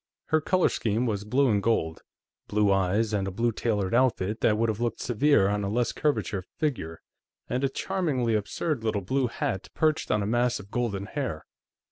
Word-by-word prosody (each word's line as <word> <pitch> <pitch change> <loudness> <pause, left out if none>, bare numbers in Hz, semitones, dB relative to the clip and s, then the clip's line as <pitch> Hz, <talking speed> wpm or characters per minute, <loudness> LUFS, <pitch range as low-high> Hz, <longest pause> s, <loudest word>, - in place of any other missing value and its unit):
Her 155 0 +3
color 185 +3 +3
scheme 115 +2 0
was 105 -3 -2
blue 135 +6 +3
and 100 -1 +2
gold; 80 -7 0 0.5
blue 105 -1 +2
eyes, 100 +3 +1
and 100 -2 0
a - - -3
blue 115 +5 +1
tailored 105 -4 -1
outfit 115 -4 +1
that 105 - +3
would 115 +1 +2
have 110 -1 -2
looked 120 -2 -1
severe 125 -3 +3
on 105 0 0
a 100 - -1
less 120 +2 +1
curvate 115 -10 -1
figure, 110 - -2 0.5
and 125 +3 -2
a 135 - +2
charmingly 140 -8 -1
absurd 110 +5 -1
little 110 -2 0
blue 130 +6 +1
hat 95 -4 -3
perched 155 -1 +1
on 105 - +1
a - - -1
mass 120 +3 +1
of 100 +1 -12
golden 105 -5 -1
hair. 125 - -4
115 Hz, 190 wpm, -27 LUFS, 100-130 Hz, 0.5 s, Her